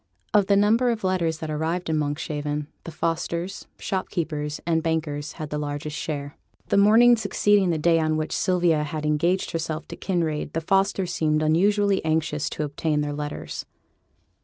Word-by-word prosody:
Of 205 -2 +4
the 200 - +4
number 225 +5 +4
of 230 -3 -2
letters 175 -4 0
that 160 -1 -5
arrived 160 +4 -2
in 160 - 0
Monkshaven, 150 0 -2 0.2
the 165 - -6
Fosters, 170 +3 -3
shopkeepers 155 -6 -3
and 165 -1 +1
bankers, 155 -2 -2
had 155 -2 -7
the 150 - -2
largest 145 +1 -4
share. 145 -2 -4 0.3
The - - +3
morning 225 +4 +7
succeeding 205 -2 +2
the 165 - +1
day 165 +1 +3
on 155 -1 +1
which 155 0 -2
Sylvia 175 -4 +2
had 150 0 -4
engaged 170 +5 +1
herself 160 -1 -3
to - - -6
Kinraid, 165 -5 -2
the 165 - -1
Fosters 195 +1 +1
seemed 155 -1 +1
unusually 200 +5 +2
anxious 155 -1 0
to - - -3
obtain 150 +1 -1
their 145 0 -2
letters. 145 0 -5
160 Hz, 165 wpm, -24 LUFS, 150-185 Hz, 0.3 s, morning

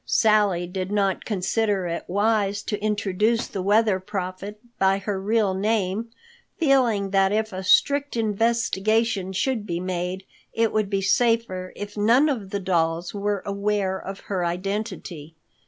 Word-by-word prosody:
Sally 210 -5 +3
did 185 +2 -4
not 200 -2 0
consider 205 -1 0
it 170 -1 -4
wise 205 +1 +1
to 210 -1 -3
introduce 210 +2 +1
the 195 - -5
Weather 205 0 +3
Prophet 195 +1 -5 0.2
by 190 0 +3
her 195 -1 -3
real 210 -1 +1
name, 205 +2 -1 0.5
feeling 245 - +2
that 195 -1 +3
if 220 0 -1
a 185 +1 -5
strict 285 +7 +3
investigation 220 -2 +1
should 210 +3 -1
be 170 -2 -2
made, 180 +1 -3 0.3
it 225 -1 +1
would 215 -2 0
be 195 -1 -1
safer 210 -3 +1
if 205 +1 -7
none 235 +9 +4
of 220 -9 -3
the 200 - -2
dolls 170 -2 0
were 205 -1 -2
aware 200 -1 -1
of 195 +1 -8
her 190 -3 -3
identity. 180 -3 -4
200 Hz, 145 wpm, -24 LUFS, 190-220 Hz, 0.5 s, none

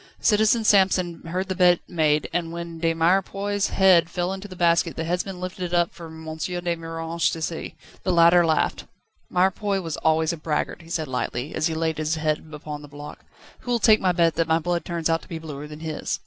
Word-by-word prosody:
Citizen 220 +1 +3
Samson 190 -4 +3
heard 185 +3 -2
the 190 - -1
bet 180 -1 +4
made, 155 -3 +1
and 170 -1 -1
when 170 -1 -6
De 165 0 +2
Mirepoix's 195 +4 +1
head 180 -4 +4
fell 180 +1 -2
into 195 +1 -7
the 185 - -10
basket, 170 -1 +2
the 165 - -3
headsman 180 +2 -3
lifted 185 0 -5
it 175 - -6
up 175 -1 +2
for 170 - -10
M. 160 0 -8
de 175 +1 -2
Miranges 165 0 -2
to 165 - -4
see. 160 0 -4 0.3
The 185 - 0
latter 170 0 +6
laughed. 160 -2 0 0.4
"Mirepoix 190 +2 +1
was 165 -4 -4
always 160 +1 +2
a - - -6
braggart," 155 +2 -2
he 165 - -15
said 160 -2 -2
lightly, 130 +1 -3
as 155 - +1
he 160 - -3
laid 160 -1 -1
his 155 +1 0
head 155 -1 -1
upon 150 -1 -7
the 145 - -11
block. 145 +1 -10 0.4
"Who'll 245 -1 -1
take 220 -2 +5
my 185 - +3
bet 170 -2 +2
that 165 - +1
my 160 0 +3
blood 175 +1 -2
turns 170 -2 -2
out 165 0 +1
to - - -17
be 165 - -4
bluer 150 -2 -7
than 150 +1 -10
his?" 160 -2 -3
170 Hz, 220 wpm, -24 LUFS, 160-180 Hz, 0.4 s, latter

